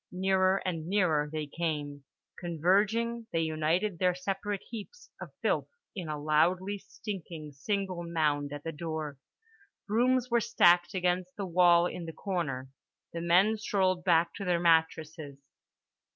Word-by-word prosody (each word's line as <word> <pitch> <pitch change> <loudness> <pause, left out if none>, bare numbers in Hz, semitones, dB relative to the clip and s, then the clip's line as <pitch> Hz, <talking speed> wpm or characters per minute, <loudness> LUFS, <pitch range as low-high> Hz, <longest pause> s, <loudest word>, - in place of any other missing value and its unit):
Nearer 190 +1 +2
and 165 -3 -3
nearer 170 -7 +2
they 155 -1 -3
came; 145 -3 -4 0.3
converging, 205 +8 +1
they 165 - +1
united 165 +4 0
their 180 -1 +2
separate 195 +2 -3
heaps 235 - -9
of - - -6
filth - - +1 0.3
in 175 -5 -5
a 150 -1 -3
loudly 175 +7 +1
stinking 170 -8 -7
single 190 +4 -3
mound 150 -4 0
at 145 0 -7
the 165 - -3
door. 155 -3 -5 0.7
Brooms 250 +3 +2
were 235 0 +3
stacked 175 -1 +4
against 180 0 0
the 200 - -4
wall 175 -1 +5
in 175 -1 -4
the 165 - -7
corner. 140 -10 -3 0.4
The 170 - -4
men 185 +6 +4
strolled 185 -4 0
back 170 -1 +3
to 200 - -5
their 180 -2 +1
mattresses. 160 -3 +1
175 Hz, 140 wpm, -30 LUFS, 160-195 Hz, 0.7 s, wall